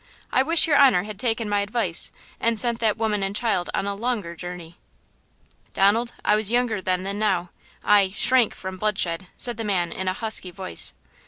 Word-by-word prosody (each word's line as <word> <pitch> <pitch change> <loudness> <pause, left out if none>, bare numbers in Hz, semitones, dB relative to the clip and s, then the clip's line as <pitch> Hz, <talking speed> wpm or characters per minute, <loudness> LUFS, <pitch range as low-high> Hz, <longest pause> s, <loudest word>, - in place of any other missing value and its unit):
I 255 - +3
wish 325 +4 +3
your 295 -3 +3
honor 255 -10 +5
had 210 -1 -8
taken 225 -2 -1
my 205 0 +1
advice 200 -4 0 0.3
and 230 -1 +2
sent 235 -1 +3
that 220 -2 +1
woman 215 -2 -1
and 195 +1 -2
child 215 -6 0
on - - -1
a 200 - -2
longer 210 -5 -3
journey." 175 -1 -9 0.9
"Donald, 225 +5 +2
I - - +4
was 215 -1 -1
younger 240 -4 0
then 185 0 -1
than 200 +1 -4
now. 185 -5 0 0.3
I–shrank 210 +4 +4
from 190 0 -7
bloodshed," 185 -3 -1
said 240 -2 -1
the 225 - -4
man 180 -5 0
in 190 - -5
a 185 - +1
husky 215 -3 -2
voice. 185 +1 -4
205 Hz, 185 wpm, -23 LUFS, 185-230 Hz, 0.9 s, honor